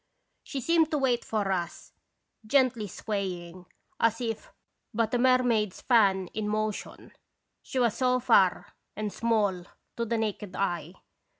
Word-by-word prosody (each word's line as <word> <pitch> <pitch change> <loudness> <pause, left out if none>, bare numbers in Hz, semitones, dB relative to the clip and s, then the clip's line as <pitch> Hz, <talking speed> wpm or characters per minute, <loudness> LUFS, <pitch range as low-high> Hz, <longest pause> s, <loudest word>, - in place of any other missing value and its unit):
She 270 - -5
seemed 325 +3 +3
to 305 - 0
wait 255 -4 +1
for 205 -3 -1
us, 175 -3 -4 0.5
gently 250 -4 +2
swaying, 185 -4 -5 0.3
as 230 0 +2
if 225 -3 -4 0.4
but 230 0 0
a 245 - +2
mermaid's 245 -5 +2
fan 200 -6 +3
in 215 -1 -4
motion, 215 0 -3 0.5
she - - -6
was 240 -4 +2
so 255 -1 +2
far 220 -7 +3 0.2
and 210 -1 -3
small 210 -6 +1 0.3
to 235 - -1
the 230 +1 -1
naked 210 -3 -3
eye. 175 -2 -2
220 Hz, 135 wpm, -28 LUFS, 195-245 Hz, 0.5 s, seemed